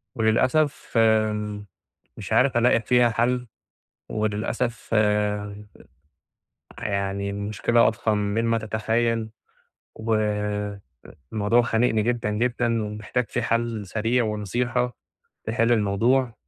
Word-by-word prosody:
وللأسف 130 +7 +1
آآ 105 -2 +2 0.5
مش - - -5
عارف 130 -2 +3
ألاقي 120 -1 +4
فيها 125 +2 +3
حل، 120 +2 0 0.6
وللأسف 110 +3 -2
آآ 105 -1 0 1.1
يعني 100 -1 -2
المشكلة 105 +3 +1
أضخم 110 -1 0
من 105 +3 0
ما 115 0 +2
تتخيل، 110 +1 -1 0.7
و 110 0 -1 1.2
الموضوع 110 +3 +3
خانقني 115 -1 +1
جدًا، 120 -1 -1
جدًا، 115 0 0
ومحتاج 105 +4 -3
فيه 125 - -1
حل 115 -2 -1
سريع 115 +5 +1
ونصيحة 120 +3 -1 0.5
تحل 115 +1 +1
الموضوع. 115 +4 +2
110 Hz, 100 wpm, -24 LUFS, 105-120 Hz, 1.2 s, ألاقي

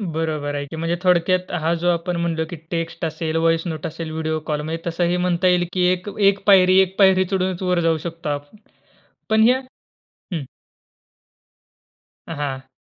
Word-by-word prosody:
बरोबर 155 -3 -2
आहे 145 - -3
की. 140 - -9
म्हणजे 165 +2 -1
थोडक्यात 180 0 +2
हा 165 +2 +1
जो 175 - +3
आपण 175 +1 0
म्हणलो 165 -1 -1
की 175 - -6 0.2
टेक्स्ट 165 0 -3
असेल, 160 0 -3
व्हॉइस 165 0 +2
नोट 160 -2 -5
असेल, 160 0 -6
व्हिडिओ 160 0 -2
कॉल 150 0 0
म्हणजे 160 +2 -4
तसंही 175 +1 0
म्हणता 180 +1 +1
येईल 180 -1 +3
की 180 -1 +2
एक 185 +3 -3
एक 200 0 +4
पायरी 185 -1 +6
एक 190 0 -1
पायरी 190 -1 +5
चढूनच 185 -1 -1
वर 180 -1 +1
जाऊ 165 -1 +2
शकतो 165 -2 -5
आपण. 145 +7 -5 0.7
पण 220 0 +4
ह्या 255 +1 +4 0.7
हं. 155 -4 -2 1.8
हां. 135 -4 -5
170 Hz, 170 wpm, -21 LUFS, 160-185 Hz, 1.8 s, पायरी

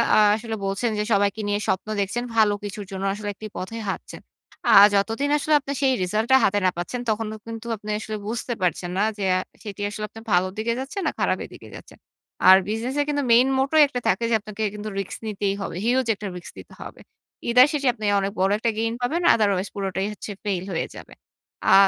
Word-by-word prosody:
আ - - +5 0.2
আসলে 225 0 -4
বলছেন 195 +5 0
যে - - +1
সবাইকে 200 +1 +1
নিয়ে 205 0 0
স্বপ্ন 190 - -1
দেখছেন। 205 +5 -2
ভালো 215 -2 +4
কিছুর 205 0 -6
জন্য 190 0 -5
আসলে 205 0 -5
একটি 215 - -8
পথেই 225 +5 -5
হাঁটছেন। - - -6 0.5
আ - - +6 0.2
যতদিন 225 +8 +1
আসলে 305 +1 0
আপনি 280 0 -6
সেই 265 -1 +3
রেজাল্ট 215 +5 -1
টা 265 - +8
হাতে 205 +1 +3
না 185 - +4
পাচ্ছেন, 175 +8 -4
তখনও 220 0 -1
কিন্তু 225 0 -7
আপনি 210 +1 -10
আসলে 215 0 -5
বুঝতে 240 +2 -3
পারছেন 175 0 0
না 200 - +2
যে 205 - -4
অ্যা 185 - +3 0.2
সেটি 205 -2 -7
আসলে 215 +1 -6
আপনি 225 - -11
ভালোর 185 +1 +3
দিকে 225 +2 0
যাচ্ছে 270 +8 -7
না - - +1
খারাপের - - 0
দিকে - - -12
যাচ্ছে। - - -12 0.5
আর 190 - +10
বিজনেস 225 +5 -2
এ - - +3
কিন্তু 290 -1 0
মেইন 240 +3 +6
motto 270 +4 0
একটা 250 -3 -4
থাকে 230 - +2
যে - - +5
আপনাকে 215 +1 -6
কিন্তু 210 0 -6
রিস্ক 195 - -5
নিতেই 200 -2 -1
হবে। 195 - -5
হিউজ 255 +2 +2
একটা 205 0 -6
রিস্ক 175 - -10
নিতে - - -13
হবে। - - -11 0.5
either 250 +2 +7
শেষে 280 -3 0
আপনি 215 -3 -6
অনেক 195 0 -1
বড় 190 +1 +3
একটা 230 - +1
গেইন 225 +1 0
পাবেন, 305 +8 0
otherwise 200 -3 +1
পুরোটাই 195 0 -2
হচ্ছে 210 - -8
ফেল 195 -4 -1
হয়ে 165 - -1
যাবে। - - -11 0.6
আ - - +7
215 Hz, 215 wpm, -24 LUFS, 195-235 Hz, 0.6 s, আর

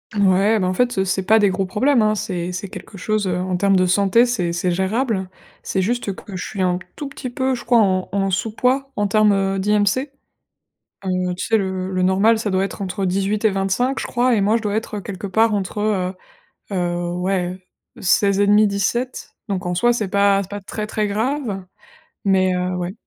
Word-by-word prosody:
Ouais, 200 +2 +3
bah 185 - 0
en 185 - 0
fait, 245 +3 0
heu, 190 - +2
c'est 190 +1 0
pas 215 +4 +4
des 205 -2 +4
gros 190 +1 -1
problèmes, 250 +6 +2
hein. 215 0 +2
C'est 180 -3 -3
c'est 185 +3 -5
quelque 195 +2 -10
chose, 215 +1 -1
heu, 180 -1 0
en 180 0 -1
termes 195 +1 +3
de 185 -1 +3
santé, 200 +6 +4
c'est 185 -9 -1
c'est 175 +1 0
gérable. 190 +2 -1 0.3
C'est 190 - -1
juste 215 -2 -1
que 195 - -10
je 185 - -4
suis 195 -2 -3
un 180 -1 +1
p - - -14
tout 290 - -5
petit 270 -2 -7
peu, 260 +1 -1
je 245 - -5
crois 240 +1 +3
en 185 -3 +1
en 195 -1 0
sous 190 +4 -1
poids 265 +4 0
en 205 - 0
termes, 215 0 +4
heu, 195 0 0
d'IMC. 210 +7 +1 0.9
Heu, 185 -1 -1
tu 180 - -4
sais 225 - +3
le 190 -2 -2
le 185 -1 -1
normal 195 +5 +3
ça 220 -2 -2
doit 190 0 +1
être 200 - -5
entre 190 +1 -2
18 195 +3 0
et - - +4
25 195 +7 0
je - - -3
crois 245 0 +2
et 210 - +2
moi 215 +3 +3
je - - -10
dois 205 -2 -1
être, 220 -1 -3
heu, - - -5
quelque 200 0 -6
part 220 +3 +2
entre, 200 0 -3
heu, 195 -3 0 0.6
heu, 175 -1 -1
ouais, 180 0 -1 0.4
heu, - - -13
16 200 +1 +3
et 205 - +3
demi 210 +1 +5
17, 205 +6 -2 0.2
donc 195 -2 -3
en 180 0 -1
soi 240 +7 +3
c'est 215 -5 -2
pas 200 0 +3
c'est 190 - -13
pas 205 - -5
très 210 +2 -5
très 215 -1 -1
grave 220 -1 -2 0.6
mais, 190 -2 +3
heu, 180 0 -1
ouais. 180 +1 -3
200 Hz, 230 wpm, -20 LUFS, 185-215 Hz, 0.9 s, demi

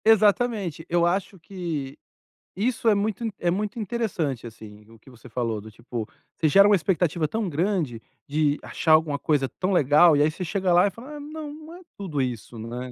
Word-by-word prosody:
Exatamente. 210 -5 +3
Eu 170 0 +3
acho 190 +2 -1
que 160 -7 -5 0.6
isso 230 +3 +1
é 210 - +4
muito 210 +2 -1 0.2
é 175 - +1
muito 210 +5 -2
interessante, 190 - -2
assim, 105 -2 -11
o 115 -1 -17
que 120 - -18
você 125 0 -15
falou, 115 -2 -2
do 110 +1 -11
tipo, 115 0 -6 0.3
você 155 - +2
gera 200 +6 +7
uma 205 - +6
expectativa 170 -2 0
tão 220 +4 -2
grande 160 - -1 0.3
de 150 0 +1
achar 160 - -1
alguma 155 -2 +3
coisa 145 -2 +1
tão 185 +1 0
legal, 150 -1 +5
e - - +3
aí 150 - +4
você 165 +4 -6
chega 185 0 0
lá 180 +3 +5
e - - -3
fala: 255 +9 -10
"Ah, - - -7
não, 300 0 -7
não 315 +2 -11
é 360 - -12 0.2
tudo 165 -8 -3
isso", 120 -2 -4
né. 120 +3 -6
170 Hz, 200 wpm, -25 LUFS, 135-205 Hz, 0.6 s, gera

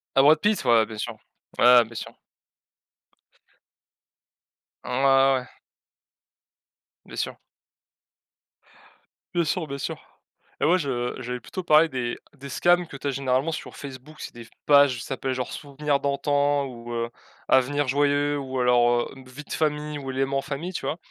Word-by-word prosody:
À 135 - +6
Brad 150 +3 +6
Pitt? 210 0 +1
Ouais, 115 -2 +5
bien 110 0 -9
sûr. 115 +2 -4 0.4
Ouais, 125 0 +8
bien 115 +1 -14
sûr. - - -7 2.7
Mmh - - -8
ouais, 125 +1 0
ouais, 135 -1 +5
ouais. 125 - -13 1.6
Bien - - -11
sûr - - -3 2.0
bien 175 -1 +2
sûr, 160 +1 -1
bien 140 - -5
sûr 135 - -4 0.6
et - - +1
moi, 175 +4 +5
je 125 -5 -2
j'allais 125 0 -4
plutôt 185 +10 -6
parler 155 0 +5
des 125 -4 -3 0.2
des 140 0 -10
scams 175 +4 +3
que 140 - -9
tu 140 - -12
as 140 - +1
généralement 135 +3 0
sur - - -7
Facebook. 140 +2 -10
C'est - - -7
des 120 -1 -11 0.2
pages 140 -2 +6
qui 120 - -6
s'appellent, 135 0 -3
genre, 125 -1 -4
Souvenirs 145 0 -2
d'antan 140 0 +1
ou, 120 -2 -9
heu, 115 0 -2 0.4
Avenir 140 +2 +3
joyeux 145 +1 +1
ou 130 -1 -5
alors, 120 -1 +4
heu, - - -9
Une 130 -1 -14
vie 140 +4 -9
de - - -8
famille 150 -1 -1
ou 135 - -7
Éléments 135 +1 0
famille, 150 +6 -5
tu - - -4
vois? 160 - -2
135 Hz, 165 wpm, -25 LUFS, 125-145 Hz, 2.7 s, Ouais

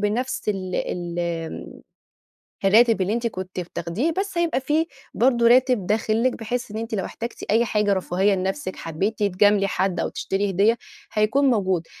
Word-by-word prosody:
بنفْس 215 +4 -1
ال 185 -3 -2
ال 175 -1 -3
آمم، 170 -2 -4 0.8
الراتب 225 +1 +5
اللي 190 +3 0
أنتِ 235 +1 -1
كنتِ 185 -4 -4
بتاخديه، 175 - -2
بس 390 -2 -2
هيبقى 335 -5 +1
في 300 +5 +1 0.3
برضه 240 -1 +3
راتب 250 -5 +4
داخل 220 +4 +1
لِك؛ - - -7
بحيث 240 +2 -4
إن 210 - -6
أنتِ 225 0 -4
لو 195 -3 -1
احتاجتِ 235 +1 -6
أي 225 +3 +4
حاجة 210 -3 +1
رفاهية 190 +1 +1
لنفسِك، 190 +4 -3
حبيتِ 190 +7 -3
تجاملي 205 0 +3
حد 190 -1 -1
أو - - -1
تشتري 195 +1 -2
هدية، 205 +5 +3 0.3
هيكون 215 +7 +2
موجود. 190 -7 0
210 Hz, 165 wpm, -23 LUFS, 190-235 Hz, 0.8 s, الراتب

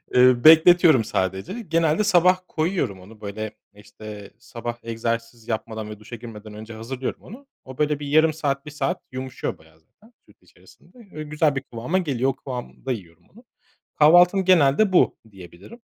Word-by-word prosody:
Iıı, 125 -1 +5
bekletiyorum 160 -4 +7
sadece 95 - -3
genelde 165 +4 +2
sabah 185 -2 +4
koyuyorum 155 - -2
onu 105 +3 -16
böyle 105 +1 -5 0.2
işte 105 0 -11
sabah 120 -1 -7
egzersiz 115 0 -4
yapmadan 110 -1 -4
ve 105 -1 -9
duşa 115 +3 -10
girmeden 110 -2 -11
önce 110 +2 -10
hazırlıyorum 125 +4 -6
onu. 265 +8 -13 0.2
O 130 -1 -11
böyle 150 -1 0
bir 145 - -6
yarım 155 +2 +3
saat, 140 -2 -2
1 150 - -8
saat 175 +5 -2
yumuşuyor 130 0 -5
bayağı 80 0 -23
zaten 220 - -26
süt - - -24
içerisinde, 255 - -22 0.2
ö 155 0 -6
güzel 150 -1 0
bir 135 - -2
kıvama 125 +8 -3
geliyor. 135 -7 0
O 135 - -3
kıvamda 130 0 -7
yiyorum 85 -7 -8
onu. 235 +4 -18 0.6
Kahvaltım 175 +5 +6
genelde 185 +3 +4
bu - - +3
diyebilirim 95 - -14
130 Hz, 160 wpm, -23 LUFS, 110-160 Hz, 0.6 s, bekletiyorum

